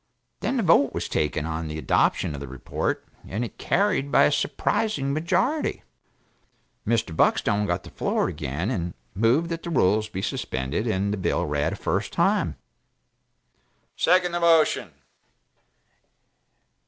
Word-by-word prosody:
Then 270 - -1
the 235 - +1
vote 160 -6 +4
was - - -2
taken 75 0 -1
on 80 0 -3
the 75 0 -5
adoption 80 - +1
of 70 - -6
the 70 - -6
report 65 -1 -3 0.2
and 110 +5 -2
it - - -11
carried 185 -8 +1
by 120 - +6
a - - +4
surprising 140 -1 0
majority. 185 - 0 1.0
Mr. 110 -8 0
Buckstone 105 +5 +2
got 90 0 -1
the - - -12
floor - - 0
again 85 - -3
and 85 -7 -3 0.2
moved 115 - +2
that 165 -1 -3
the 170 - -6
rules 110 - +2
be 95 -2 -5
suspended 65 - -2
and 100 -1 0
the - - -2
bill 95 - 0
read 75 0 0
a - - -4
first - - -2
time. - - +1
Mr. - - -45 0.3
Trollop 180 +2 +6
"Second 180 -1 -3
the 175 - -1
motion!" 165 - +3
110 Hz, 155 wpm, -25 LUFS, -, 1.0 s, by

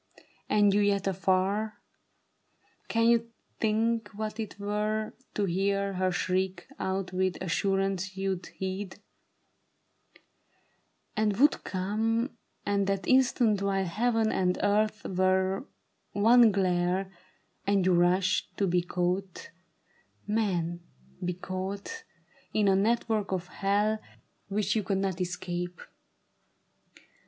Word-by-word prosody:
And 205 -1 +4
you 205 - +3
yet 200 -1 +2
afar? 195 +3 +1 1.1
Can 230 0 +2
you 230 0 +3 0.3
think 225 0 +1
what 215 +1 -4
it 215 -2 -5
were 210 +1 -1 0.2
To 205 - +1
hear 195 +2 0
her 185 0 +1
shriek 185 0 -1
out 190 -1 -2
with 185 0 0
assurance 195 +1 -1
you'd 190 -1 -2
heed 190 +1 -5 2.2
And 215 -2 +1
would 290 +5 +4
come, 225 +6 -1 0.3
and 200 -1 +1
that 195 -1 -1
instant, 245 -5 +3
while 195 -1 +1
heaven 225 +4 +1
and 180 -1 +1
earth 215 +2 +1
Were 190 +4 +1 0.5
one 230 +2 +6
glare, 185 0 +1 0.6
and 200 -2 +3
you 185 - +4
rushed, 180 +2 +2
to 200 - +2
be 180 -1 +2
caught, 180 +2 -2 0.7
man, 180 -6 0 0.4
be 180 0 -1
caught 195 - -5 0.5
In 210 -2 +3
a 195 - +5
network 215 0 +1
of 185 -2 -1
hell 205 +3 +1 0.5
which 205 +1 0
you 220 - +2
could 195 -1 -1
not 190 -2 -1
escape. 175 0 -3
195 Hz, 110 wpm, -29 LUFS, 185-215 Hz, 2.2 s, one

